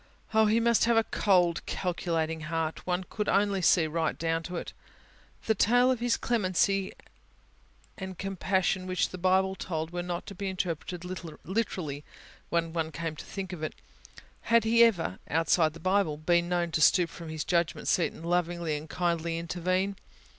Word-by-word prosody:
Oh, 220 Hz, 0 st, +5 dB
He 220 Hz, +2 st, +3 dB
must 235 Hz, -1 st, +3 dB
have 235 Hz, 0 st, +3 dB
a 225 Hz, -, +5 dB
cold, 180 Hz, -6 st, +2 dB
calculating 165 Hz, -3 st, -2 dB
heart... 160 Hz, 0 st, -2 dB
could 185 Hz, +3 st, -2 dB
one -, -, +4 dB
only 200 Hz, -2 st, 0 dB
see 170 Hz, -1 st, +4 dB
right 160 Hz, +1 st, -1 dB
down 165 Hz, 0 st, 0 dB
into 170 Hz, +2 st, -6 dB
it. -, -, -5 dB, 0.7 s
The 220 Hz, -, +3 dB
tale 245 Hz, +5 st, +4 dB
of 255 Hz, -, -1 dB
His 240 Hz, 0 st, +1 dB
clemency 195 Hz, -3 st, +1 dB, 1.1 s
and 190 Hz, -2 st, -6 dB
compassion, 190 Hz, 0 st, 0 dB
which 185 Hz, -1 st, 0 dB
the 185 Hz, -, -8 dB
Bible 190 Hz, +1 st, +3 dB
told, 160 Hz, -4 st, -4 dB
was 175 Hz, 0 st, -3 dB
not 175 Hz, -1 st, -4 dB
to -, -, -8 dB
be 195 Hz, +1 st, -4 dB
interpreted 180 Hz, -1 st, -4 dB
literally: 180 Hz, -3 st, -4 dB, 0.5 s
when 165 Hz, -1 st, 0 dB
one 160 Hz, -1 st, -2 dB
came 160 Hz, 0 st, -4 dB
to -, -, -9 dB
think 190 Hz, -2 st, -6 dB
of 170 Hz, -, -7 dB
it, 155 Hz, -, -4 dB, 0.7 s
had 230 Hz, -1 st, +5 dB
He 230 Hz, +1 st, +5 dB
ever 170 Hz, -, +2 dB
outside 165 Hz, 0 st, +2 dB
the 165 Hz, -, -11 dB
Bible 185 Hz, -3 st, +1 dB
been 170 Hz, +2 st, +1 dB
known 175 Hz, -1 st, 0 dB
to 165 Hz, -2 st, 0 dB
stoop 175 Hz, +2 st, +5 dB
from 165 Hz, -2 st, -9 dB
His 155 Hz, -1 st, -3 dB
judgment 170 Hz, -2 st, 0 dB
seat, 175 Hz, -, +2 dB
and 165 Hz, -, -11 dB
lovingly 170 Hz, -2 st, 0 dB
and 150 Hz, +1 st, -9 dB
kindly 170 Hz, -1 st, -1 dB
intervene? 185 Hz, +3 st, -1 dB
180 Hz, 175 wpm, -29 LUFS, 165-195 Hz, 1.1 s, Oh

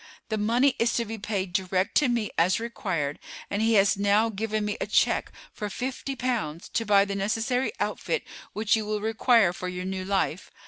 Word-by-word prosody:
The 220 Hz, -, -1 dB
money 245 Hz, +6 st, +3 dB
is 230 Hz, +1 st, +2 dB
to 235 Hz, -, 0 dB
be 220 Hz, 0 st, -6 dB
paid 195 Hz, -3 st, -3 dB
direct 185 Hz, +1 st, 0 dB
to 295 Hz, -, +4 dB
me 235 Hz, -3 st, 0 dB
as 180 Hz, +5 st, +3 dB
required, 185 Hz, -11 st, -3 dB, 0.3 s
and 200 Hz, -, 0 dB
he 225 Hz, 0 st, +3 dB
has 200 Hz, -1 st, +4 dB
now 205 Hz, +3 st, +3 dB
given 215 Hz, 0 st, -2 dB
me 210 Hz, -, -2 dB
a -, -, -1 dB
check -, -, +2 dB, 0.2 s
for 210 Hz, -, -4 dB
fifty 260 Hz, +5 st, -4 dB
pounds 225 Hz, -11 st, -2 dB
to 225 Hz, -, -2 dB
buy 200 Hz, -1 st, +5 dB
the 200 Hz, -, -4 dB
necessary 225 Hz, -, 0 dB
outfit -, -, -1 dB, 0.3 s
which 215 Hz, +1 st, +2 dB
you 220 Hz, -, -1 dB
will 210 Hz, 0 st, -2 dB
require 220 Hz, -3 st, +3 dB
for 180 Hz, -, -5 dB
your 180 Hz, 0 st, -4 dB
new 190 Hz, 0 st, -3 dB
life. 190 Hz, -2 st, -1 dB
210 Hz, 195 wpm, -26 LUFS, 190-230 Hz, 0.3 s, buy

